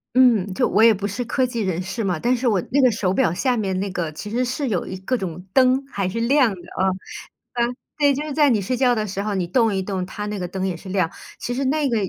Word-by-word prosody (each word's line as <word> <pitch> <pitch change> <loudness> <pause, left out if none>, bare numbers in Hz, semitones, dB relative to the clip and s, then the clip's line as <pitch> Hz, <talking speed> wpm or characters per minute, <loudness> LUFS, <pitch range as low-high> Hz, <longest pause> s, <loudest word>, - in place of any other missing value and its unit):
嗯， 225 -7 +4
就 - - +2
我 220 - +3
也 230 -1 +8
不 200 0 -3
是 205 +5 -3
科 255 +2 0
技 235 -2 -3
人 185 -3 -1
士 190 +5 -4
嘛， 180 -5 -1
但 245 +6 +2
是 250 +1 -4
我 210 -6 +3
那 280 +2 +3
个 255 - +5
手 195 -4 0
表 165 - +2
下 250 +7 +1
面 195 -5 -1
那 200 +1 -2
个 170 -4 -3
其 160 +7 -7
实 245 +4 0
是 260 +3 -2
有 195 -7 -1
一 190 - -6
各 190 +7 -1
种 180 -4 -5
灯， 260 +1 +4
还 195 -6 -2
是 230 - -3
亮 260 +2 +4
的， 180 - -10 0.2
啊， 190 - +3 0.7
呃， 235 -1 +1 0.3
对， 290 -2 +4
就 275 - -3
是 305 -1 -5
在 295 0 +4
你 220 -5 +2
睡 225 +7 -1
觉 250 -1 +3
的 215 -1 -1
时 195 0 -3
候 210 -1 -2
你 180 -2 -1
动 225 +3 +2
一 190 - 0
动 190 -1 -3
它 205 +3 -6
那 210 -1 -3
个 180 - -3
灯 190 +1 -2
也 185 - -2
是 190 - -11
亮， 185 -3 +1 0.3
其 245 - -3
实 270 - -1
那 295 +1 +1
个 235 - 0
215 Hz, 305 characters per minute, -22 LUFS, 190-255 Hz, 0.7 s, 也